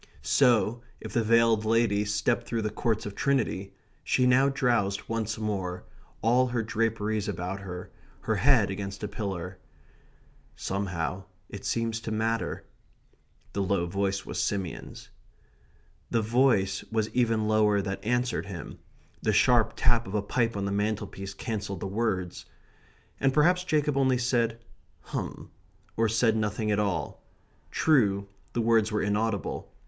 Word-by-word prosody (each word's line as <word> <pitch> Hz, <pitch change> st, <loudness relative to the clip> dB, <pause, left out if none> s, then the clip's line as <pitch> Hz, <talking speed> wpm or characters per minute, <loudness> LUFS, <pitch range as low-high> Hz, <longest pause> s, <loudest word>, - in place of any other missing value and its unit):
So, 120 Hz, -3 st, +3 dB, 0.2 s
if -, -, -8 dB
the 115 Hz, -, +2 dB
veiled 115 Hz, -1 st, +4 dB
lady 110 Hz, -2 st, +2 dB
stepped 110 Hz, +3 st, 0 dB
through 115 Hz, -2 st, -1 dB
the 105 Hz, -, -1 dB
Courts 110 Hz, 0 st, -1 dB
of 105 Hz, -, -5 dB
Trinity, 115 Hz, -7 st, -1 dB, 0.3 s
she 125 Hz, -, +2 dB
now 130 Hz, +2 st, +5 dB
drowsed 120 Hz, -7 st, 0 dB
once 110 Hz, -1 st, -2 dB
more, 95 Hz, -5 st, -3 dB, 0.4 s
all 125 Hz, +3 st, +4 dB
her 120 Hz, -2 st, -1 dB
draperies 110 Hz, -1 st, -1 dB
about 95 Hz, 0 st, -3 dB
her, 90 Hz, -2 st, -7 dB, 0.3 s
her -, -, 0 dB
head -, -, +4 dB
against 100 Hz, +1 st, -5 dB
a -, -, -1 dB
pillar. 95 Hz, -3 st, -5 dB, 1.0 s
"Somehow 95 Hz, -1 st, -3 dB, 0.2 s
it 100 Hz, -, -8 dB
seems 115 Hz, -1 st, -1 dB
to 115 Hz, 0 st, -6 dB
matter." 110 Hz, +1 st, -1 dB, 0.9 s
The 100 Hz, -, -1 dB
low 95 Hz, -2 st, +1 dB
voice 95 Hz, +2 st, -1 dB
was -, -, -3 dB
Simeon's. 95 Hz, -5 st, -4 dB, 1.0 s
The 115 Hz, -1 st, +1 dB
voice 110 Hz, -5 st, +2 dB
was 110 Hz, -1 st, 0 dB
even 115 Hz, -3 st, +2 dB
lower 105 Hz, -1 st, +3 dB
that 95 Hz, 0 st, -3 dB
answered 120 Hz, -2 st, 0 dB
him. 90 Hz, -6 st, -8 dB, 0.4 s
The -, -, +1 dB
sharp 120 Hz, -3 st, +4 dB
tap 120 Hz, -3 st, +2 dB
of 95 Hz, -, -5 dB
a 105 Hz, -, +1 dB
pipe 115 Hz, +1 st, 0 dB
on 100 Hz, -, -2 dB
the 100 Hz, -, -1 dB
mantelpiece 100 Hz, -1 st, -2 dB
cancelled 105 Hz, -4 st, -4 dB
the -, -, -3 dB
words. 95 Hz, -3 st, -2 dB, 0.7 s
And 135 Hz, -, +3 dB
perhaps 175 Hz, +6 st, +3 dB
Jacob 150 Hz, -4 st, +1 dB
only 130 Hz, -2 st, +3 dB
said 120 Hz, -2 st, 0 dB, 0.4 s
"hum," -, -, -6 dB, 0.4 s
or 115 Hz, 0 st, +2 dB
said 115 Hz, 0 st, +3 dB
nothing 105 Hz, 0 st, -1 dB
at 105 Hz, -, +2 dB
all. 90 Hz, -8 st, -2 dB, 0.5 s
True, 100 Hz, -10 st, +2 dB, 0.3 s
the 120 Hz, -, 0 dB
words 115 Hz, -1 st, +3 dB
were 105 Hz, -, 0 dB
inaudible. 105 Hz, -2 st, -1 dB
110 Hz, 145 wpm, -28 LUFS, 100-115 Hz, 1.0 s, now